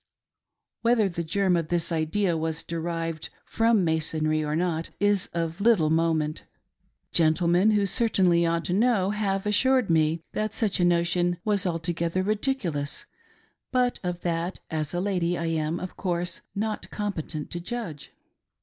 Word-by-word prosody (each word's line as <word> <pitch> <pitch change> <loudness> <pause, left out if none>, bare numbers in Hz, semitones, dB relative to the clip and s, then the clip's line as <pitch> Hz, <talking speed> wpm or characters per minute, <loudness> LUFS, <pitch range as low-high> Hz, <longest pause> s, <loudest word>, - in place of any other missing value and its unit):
Whether 230 -3 +3
the 170 -1 -3
germ 185 +2 +1
of 165 -2 -1
this 170 +1 0
idea 165 +3 +1
was 160 0 -2
derived 165 -1 -3 0.2
from 225 -4 +2
Masonry, 155 -1 +1
or 150 0 -1
not, 165 -1 -1
is 205 -2 +2
of 165 +1 -3
little 200 -9 +4
moment. 160 -2 +1 0.7
Gentlemen 170 +4 +3
who 210 -2 +3
certainly 190 -5 +3
ought 165 -1 0
to 175 - -1
know 205 -2 +2
have 200 -2 -1
assured 250 0 +3
me 160 0 +3
that 215 0 -2
such 210 -4 0
a - - +3
notion 175 0 +2
was 205 -3 +1
altogether 170 +1 -1
ridiculous; 205 - -1 0.7
but 250 -1 +1
of 180 -1 -3
that, 170 +1 -2
as 155 -2 -2
a - - 0
lady, 180 -3 0
I 170 - -2
am, 160 +1 -1
of 185 - -6
course, 175 -1 -2
not 215 +1 -3
competent 170 -7 -4
to 175 - -3
judge. 175 -6 -6
175 Hz, 150 wpm, -26 LUFS, 165-205 Hz, 0.7 s, little